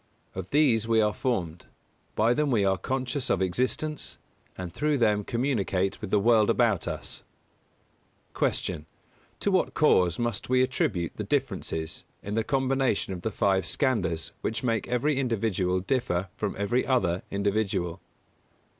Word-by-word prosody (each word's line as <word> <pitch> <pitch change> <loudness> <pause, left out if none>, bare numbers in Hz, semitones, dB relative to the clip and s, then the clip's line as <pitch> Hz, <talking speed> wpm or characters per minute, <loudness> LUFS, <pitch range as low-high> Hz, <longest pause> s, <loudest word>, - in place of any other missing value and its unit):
Of 95 -1 -6
these 125 -7 +3
we 115 -1 +3
are 105 -1 +3
formed; 90 - -2 0.5
by 115 +3 +3
them 150 +2 +1
we 110 -6 +2
are 95 0 +3
conscious 130 +5 -2
of - - +2
existence; 130 - -1 0.4
and 90 -3 -6
through 150 -1 +1
them 105 -4 +2
communicate 100 -6 -1
with 105 - -5
the 105 - +3
world 110 0 +4
about 110 -8 +2
us. - - -5 1.1
237. 80 -4 -1 0.5
Q. 200 - +1
_To - - -1
what 185 - +1
cause 90 - +4
must 120 -1 -2
we 130 0 +4
attribute 95 -9 -1
the 105 - -2
differences 100 - -2 0.2
in 100 - -4
the 110 +1 +1
combination 135 -6 0
of 90 - -6
the 110 - -1
five 95 -2 +1
Skandhas 90 - 0
which 115 - -2
make 115 -4 0
every 130 +4 +1
individual 100 -8 0
differ 95 -5 -1
from 105 -2 -3
every 100 +6 +1
other 95 -9 +1
individual? 100 -3 -1
110 Hz, 150 wpm, -27 LUFS, 95-130 Hz, 1.1 s, world